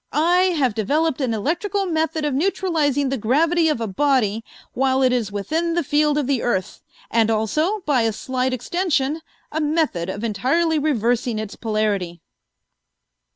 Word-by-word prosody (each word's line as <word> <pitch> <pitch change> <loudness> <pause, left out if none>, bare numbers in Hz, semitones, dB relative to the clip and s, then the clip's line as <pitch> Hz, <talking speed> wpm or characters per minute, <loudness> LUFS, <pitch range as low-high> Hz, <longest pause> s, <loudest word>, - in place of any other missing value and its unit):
I 355 +4 +3
have 260 -6 +2
developed 290 +8 0
an 255 -3 0
electrical 345 - -1
method 320 -2 -1
of 295 - -1
neutralizing 295 -4 0
the 270 -1 -2
gravity 320 +9 +2
of 300 - 0
a 230 - -2
body 225 -1 +1 0.3
while 265 +1 +1
it 255 -1 +3
is 230 -5 -1
within 320 +12 -1
the 345 - +1
field 295 +1 +2
of 295 - 0
the 270 -2 0
earth, 190 -7 -2 0.3
and 225 -1 +3
also, 305 - 0
by 290 -8 +1
a 225 0 +1
slight 255 +4 -2
extension, 300 +2 -1 0.3
a 315 - -2
method 295 - 0
of 205 +3 -5
entirely 275 - +1
reversing 245 -5 0
its 215 -1 -5
polarity." 210 -6 -2
270 Hz, 155 wpm, -21 LUFS, 225-320 Hz, 0.3 s, I